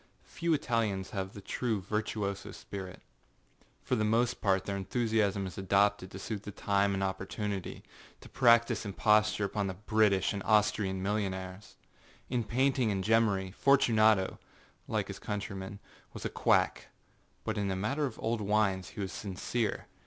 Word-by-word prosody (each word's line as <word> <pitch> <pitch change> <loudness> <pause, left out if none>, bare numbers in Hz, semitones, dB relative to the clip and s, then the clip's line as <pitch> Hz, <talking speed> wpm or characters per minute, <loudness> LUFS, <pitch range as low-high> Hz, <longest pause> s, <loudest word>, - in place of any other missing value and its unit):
Few 170 -1 -2
Italians 115 -9 0
have 95 -1 -4
the 100 - -9
true 115 0 -1
virtuoso 100 0 -3
spirit. 95 -2 -8 0.8
For 130 - -2
the 110 - 0
most 115 +3 +1
part 95 -2 +2
their 100 - -2
enthusiasm 105 -1 0
is 95 0 -7
adopted 100 0 +2
to 95 - -9
suit 100 +1 -5
the 105 - -8
time 100 0 +1
and 95 - -1
opportunityâto 95 0 -4 0.5
practise 115 -2 +4
imposture 105 0 +2
upon 100 0 -1
the 95 - -4
British 105 -1 +2
and 100 - -4
Austrian 105 -3 +2
millionaires. 95 -1 -3 0.6
In 125 -2 +1
painting 130 +1 +1
and 95 -2 -1
gemmary, 100 -3 +2
Fortunato, 110 -7 +3 0.5
like - - -1
his - - -7
countrymen, 100 -1 -5 0.4
was - - -7
a - - -2
quackâbut - - -1
in 100 -1 0
the 95 - -1
matter 135 +10 0
of 120 - -9
old 115 0 -1
wines 100 -2 +1
he - - -7
was 95 -1 -3
sincere. 105 +4 -3
105 Hz, 145 wpm, -31 LUFS, 95-110 Hz, 0.8 s, practise